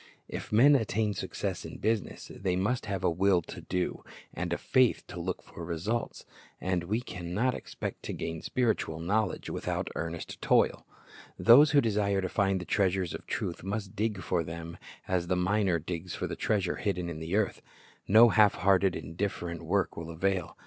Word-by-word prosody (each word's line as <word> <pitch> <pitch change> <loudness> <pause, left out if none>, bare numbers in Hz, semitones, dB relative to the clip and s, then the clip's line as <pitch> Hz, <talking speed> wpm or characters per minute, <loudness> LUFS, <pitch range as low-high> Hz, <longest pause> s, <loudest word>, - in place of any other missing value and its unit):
If - - -6
men 125 +7 +7
attain 110 -3 +1
success 95 - -4
in - - -8
business, 110 -1 -2
they 95 -2 -1
must 105 +5 -1
have 95 -2 -3
a - - +4
will 90 0 +3
to - - -9
do, 90 -1 -2 0.3
and 90 +1 -3
a 85 - +1
faith 130 -3 +2
to 90 - -6
look 90 +2 -3
for 85 - -10
results. 90 +8 -3 0.3
And 90 -1 -1
we 110 +6 0
can 90 -6 -6
not 125 +4 +2
expect - - -6
to - - -3
gain 80 -1 -4
spiritual 110 -10 0
knowledge 100 +4 -1
without - - -2
earnest 85 +1 -5
toil. - - +2 0.5
Those 140 +6 +8
who 145 - +5
desire 100 -3 +1
to 95 -1 -2
find 95 -1 +1
the 90 - -6
treasures 95 -3 +1
of - - -8
truth - - -3
must 100 0 -4
dig 105 -1 -1
for 90 -2 0
them 85 +1 -7 0.3
as 90 -2 0
the 90 - +1
miner 90 0 +2
digs 85 +2 -5
for - - -3
the - - -4
treasure 100 -5 0
hidden 90 -5 -1
in 85 -2 -5
the 80 +4 -3
earth. 105 -2 0 0.5
No 110 +4 +8
half 105 -1 +5
hearted, 95 +1 +3
indif 95 +5 -2
ferent 85 -1 -5
work - - 0
will 85 0 -6
avail. 90 +1 -1
95 Hz, 185 wpm, -29 LUFS, 85-105 Hz, 0.5 s, Those